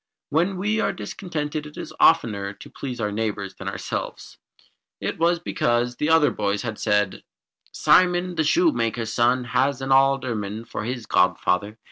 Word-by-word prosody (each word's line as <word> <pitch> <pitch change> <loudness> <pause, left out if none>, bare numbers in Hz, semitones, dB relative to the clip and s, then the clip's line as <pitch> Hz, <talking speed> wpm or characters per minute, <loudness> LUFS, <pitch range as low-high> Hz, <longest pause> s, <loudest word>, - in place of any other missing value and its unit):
When 175 +5 +1
we 210 +4 0
are - - +1
discontented 150 -5 -5
it 150 - -14
is - - -7
oftener 105 -11 +3
to 100 - -13
please 125 -3 -6
our 105 -2 -1
neighbours 105 -2 -3
than 95 - -9
ourselves. 95 - -5 0.6
It - - -4
was 170 +1 +3
because 125 -8 0
the 150 - 0
other 160 -4 +5
boys 100 -2 -1
had 110 -3 -5
said 105 -2 +1 0.5
"Simon, 180 0 +3
the 160 - 0
shoemaker's 120 - +1
son, 125 +1 +2
has 130 +2 0
an 135 0 -3
alderman 125 -6 +1
for 105 - -5
his 120 -1 -4
godfather. 90 +4 +1
125 Hz, 155 wpm, -23 LUFS, 105-160 Hz, 0.6 s, other